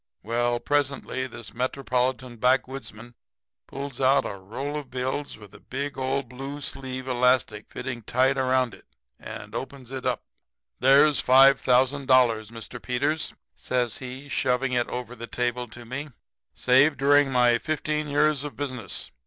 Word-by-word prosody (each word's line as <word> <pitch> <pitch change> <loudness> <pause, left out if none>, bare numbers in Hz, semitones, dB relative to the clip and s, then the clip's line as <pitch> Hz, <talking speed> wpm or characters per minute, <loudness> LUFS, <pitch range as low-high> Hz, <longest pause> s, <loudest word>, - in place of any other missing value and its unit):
"Well, 120 +2 0
presently 140 -2 -1
this 115 -4 -11
metropolitan 125 0 -1
backwoodsman 125 -2 -1 0.5
pulls 140 -2 -6
out 135 +1 +4
a - - -3
roll 120 +10 -5
of 145 -3 -5
bills 130 +3 -3
with 105 -2 -14
an - - -15 0.3
old 130 0 -1
blue 135 +3 -7
sleeve 130 -2 -5
elastic 125 -4 +1
fitting 125 -2 -5
tight 130 +5 +2
around 130 -3 +1
it - - -16 0.3
and 105 +1 -9
opens 130 +1 -6
it 130 -1 -5
up. 125 -2 -1 0.6
"'There's 140 +2 +5
$5,000, 130 +1 +5 0.4
Mr. 115 -1 -9
Peters,' 145 +5 -1 0.2
says 125 -3 -1
he, 130 +2 -8
shoving 130 -1 0
it 120 -1 +1
over 125 -1 -5
the 115 0 -7
table 125 0 -2
to 120 +1 -12
me, 140 +5 -5 0.5
'saved 135 +4 +4
during 145 0 +4
my 120 -2 +4
fifteen 155 0 -2
years 145 0 +2
of 150 - -7
business. 130 -9 -4
130 Hz, 140 wpm, -26 LUFS, 125-140 Hz, 0.6 s, There's